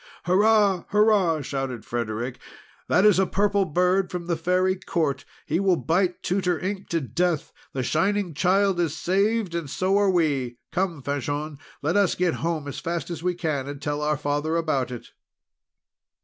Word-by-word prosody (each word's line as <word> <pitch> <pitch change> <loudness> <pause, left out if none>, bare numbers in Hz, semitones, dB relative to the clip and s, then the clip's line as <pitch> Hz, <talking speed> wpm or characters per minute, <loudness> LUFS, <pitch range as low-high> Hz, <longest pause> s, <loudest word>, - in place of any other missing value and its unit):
"Hurrah! 200 0 +3
Hurrah!" 205 -7 +3
shouted 135 -4 -4
Frederic. 120 +1 -3 0.5
"That 190 - +3
is 210 -3 +6
a 190 - +3
Purple 200 0 +2
Bird 180 +4 +1
from 180 -1 -5
the 170 -1 0
Fairy 180 +3 +1
Court! 160 -6 -2 0.2
He 160 +3 0
will 190 -2 +3
bite 180 +2 0
Tutor 180 -2 0
Ink 195 +1 -4
to 165 - +1
death! 155 - -1 0.2
The 130 - -2
Shining 195 - 0
Child 190 +4 +2
is 160 -2 0
saved! 200 +3 +1
and 170 -4 -3
so 190 +7 +1
are 200 -1 +3
we! 140 -9 0
Come, 175 -6 -1
Fanchon, 145 +2 -3 0.2
let 160 +5 +1
us 200 -3 +3
get 180 -2 +1
home 165 -3 -2
as 140 - -5
fast 170 -1 -3
as 165 -3 -5
we 180 0 0
can, 155 -6 -2
and 145 -1 -6
tell 145 +1 -2
our 150 0 +1
father 145 +2 -1
about 155 -6 0
it." 125 -2 -8
170 Hz, 170 wpm, -25 LUFS, 145-190 Hz, 0.5 s, is